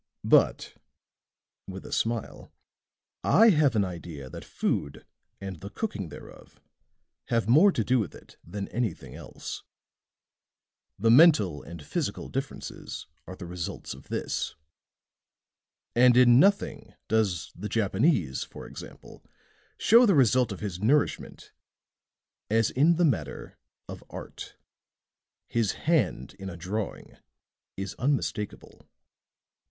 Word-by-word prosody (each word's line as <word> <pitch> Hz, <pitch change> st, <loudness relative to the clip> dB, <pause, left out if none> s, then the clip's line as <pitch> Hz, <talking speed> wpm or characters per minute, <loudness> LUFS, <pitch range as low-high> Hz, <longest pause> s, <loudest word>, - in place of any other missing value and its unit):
"But," -, -, +3 dB, 0.9 s
with 95 Hz, 0 st, -8 dB
a -, -, -9 dB
smile, 115 Hz, -1 st, -2 dB, 0.7 s
"I 225 Hz, +3 st, +6 dB
have 150 Hz, -, +3 dB
an 100 Hz, -2 st, +3 dB
idea 85 Hz, -7 st, -8 dB
that -, -, -8 dB
food 70 Hz, -, -3 dB, 0.3 s
and 95 Hz, -3 st, -7 dB
the 100 Hz, -, -8 dB
cooking 105 Hz, -, -4 dB
thereof 75 Hz, -, -13 dB, 0.7 s
has 115 Hz, -3 st, 0 dB
more 160 Hz, -, +6 dB
to 115 Hz, -, -1 dB
do 125 Hz, +3 st, +2 dB
with 105 Hz, -, -3 dB
it -, -, -16 dB
than 100 Hz, +4 st, -6 dB
anything 90 Hz, -, -3 dB
else. -, -, -8 dB, 1.4 s
The 115 Hz, +3 st, +3 dB
mental 115 Hz, -, +6 dB
and 85 Hz, -3 st, -10 dB
physical -, -, -3 dB
differences -, -, -6 dB, 0.2 s
are 95 Hz, -, -7 dB
the 90 Hz, -, -9 dB
results 85 Hz, -1 st, -5 dB
of -, -, -14 dB
this. -, -, -3 dB, 1.4 s
And 125 Hz, 0 st, +5 dB
in 125 Hz, -1 st, +7 dB
nothing 190 Hz, -, +1 dB
does 105 Hz, -7 st, 0 dB
the 105 Hz, +4 st, -6 dB
Japanese, 100 Hz, -, +1 dB
for -, -, -11 dB
example, -, -, -11 dB, 0.5 s
show 235 Hz, +3 st, +6 dB
the 195 Hz, -, +4 dB
result 125 Hz, -3 st, +4 dB
of 100 Hz, -, -7 dB
his 95 Hz, -4 st, -4 dB
nourishment 140 Hz, +9 st, 0 dB, 1.0 s
as 115 Hz, +1 st, +2 dB
in 155 Hz, +6 st, +4 dB
the 175 Hz, +1 st, +3 dB
matter 80 Hz, -, -2 dB, 0.3 s
of -, -, -9 dB
art. -, -, -9 dB, 0.9 s
His 115 Hz, -3 st, 0 dB
hand 165 Hz, 0 st, 0 dB
in 95 Hz, 0 st, -6 dB
a 85 Hz, -, -8 dB
drawing 100 Hz, +5 st, -5 dB, 0.6 s
is 95 Hz, -1 st, -4 dB
unmistakable." 125 Hz, -6 st, -3 dB
110 Hz, 120 wpm, -27 LUFS, 95-130 Hz, 1.4 s, in